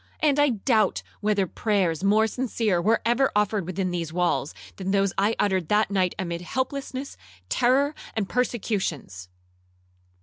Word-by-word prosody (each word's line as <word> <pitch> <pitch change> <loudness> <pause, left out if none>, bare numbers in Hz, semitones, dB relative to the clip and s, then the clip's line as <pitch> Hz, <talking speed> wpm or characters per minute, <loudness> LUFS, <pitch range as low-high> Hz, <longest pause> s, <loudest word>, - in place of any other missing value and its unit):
And 290 -2 +2
I 290 0 +5
doubt 220 -2 +1 0.2
whether 205 -2 +1
prayers 185 -4 0
more 210 +2 +4
sincere 225 -5 -1
were 220 +5 +2
ever 240 +4 +2
offered 210 -3 +1
within 185 0 -2
these 170 -3 -3
walls, 165 -5 0 0.3
than 190 -1 -4
those 195 -1 +2
I 205 +3 +1
uttered 190 -5 +1
that 210 +1 +2
night 185 -2 +1
amid 170 -2 -3
helplessness, 260 +5 -4 0.3
terror, 270 +4 +2 0.2
and 215 -3 -1
persecutions!' 190 - -2
205 Hz, 140 wpm, -25 LUFS, 185-235 Hz, 0.3 s, I